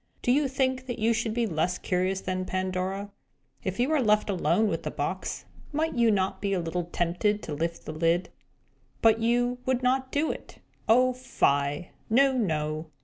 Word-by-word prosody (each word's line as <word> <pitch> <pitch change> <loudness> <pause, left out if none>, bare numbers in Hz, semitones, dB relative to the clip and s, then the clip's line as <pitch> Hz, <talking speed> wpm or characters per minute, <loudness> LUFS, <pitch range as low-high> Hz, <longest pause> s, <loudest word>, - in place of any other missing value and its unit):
Do 245 - +3
you 285 +2 +3
think 260 -1 -1
that 245 - -3
you 230 +1 +2
should 225 -1 -1
be 240 -1 +2
less 175 -2 0
curious 185 +1 -1
than 185 0 -2
Pandora? 185 +2 -2 0.5
If 190 +3 -3
you 250 +4 +2
were 310 -3 +3
left 210 -2 +3
alone 180 +3 +2
with - - -1
the - - -3
box, - - -3 0.3
might 315 +2 0
you 235 -2 +3
not 195 -2 0
feel 195 -2 0
a - - -3
little 170 +1 -2
tempted 180 +5 0
to 150 - -5
lift 165 +3 -3
the - - -4
lid? 165 +3 +1 0.7
But 225 0 +5
you 245 +2 +1
would 260 -1 +1
not 260 +1 +1
do 300 +2 +1
it. - - -10 0.3
Oh, 255 +3 +5
fie! 145 - 0 0.2
No, 265 +4 +4
no! 155 -7 -1
210 Hz, 185 wpm, -27 LUFS, 180-245 Hz, 0.7 s, But